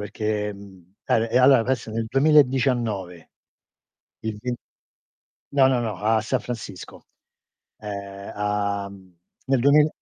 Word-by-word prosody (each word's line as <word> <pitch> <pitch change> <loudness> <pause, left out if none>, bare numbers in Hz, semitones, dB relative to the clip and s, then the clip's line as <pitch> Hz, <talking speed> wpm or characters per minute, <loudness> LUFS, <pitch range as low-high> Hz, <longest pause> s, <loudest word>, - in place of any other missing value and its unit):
perché 105 0 -2
mhmm, 95 -2 -15
eh, 115 0 +1
e 125 - +3
allo 130 -2 +6
questo 125 -3 -2
nel 115 0 -2
2019. 125 - +2 0.9
Il 110 -1 -4
ven 125 0 -2 1.0
No, 135 -2 +5
no, 130 -2 +2
no, 110 -5 -3
a 110 +2 +2
San 125 +4 -1
Francisco. 105 -6 -8 0.7
Ehm, 100 -1 -7
a 100 -1 -1
mhmm, 95 -2 -16 0.3
nel 135 -2 +2
duemila 145 +4 +5
110 Hz, 125 wpm, -24 LUFS, 100-125 Hz, 1.0 s, allo